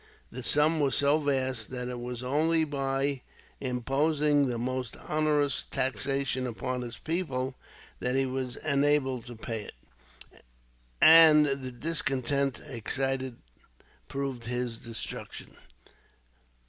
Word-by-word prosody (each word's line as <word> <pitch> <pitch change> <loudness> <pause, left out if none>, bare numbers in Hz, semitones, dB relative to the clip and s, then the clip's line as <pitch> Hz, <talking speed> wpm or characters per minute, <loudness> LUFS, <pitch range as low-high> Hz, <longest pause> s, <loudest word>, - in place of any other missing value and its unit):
The 130 - -6
sum 150 +5 +2
was 140 -4 +2
so 145 +2 +3
vast 130 -5 -1
that 125 -1 -4
it 125 -1 -5
was 125 0 -5
only 160 +5 +2
by 135 -2 -1 0.4
imposing 140 +3 +1
the 120 -2 -2
most 125 -1 -3
onerous 150 -3 +1
taxation 130 +1 0
upon 125 +2 -3
his 120 -1 -6
people 135 -6 -2 0.5
that 125 +1 -1
he 135 0 +2
was 130 -1 -3
enabled 140 -4 +1
to 120 - -8
pay 115 0 -4
it, - - -16 0.6
and 160 -2 +9
the 135 -2 -2
discontent 135 -1 -1
excited 135 0 -2 0.7
proved 135 -4 -4
his 120 -1 -2
destruction. 115 -1 -6
135 Hz, 115 wpm, -29 LUFS, 125-145 Hz, 0.7 s, and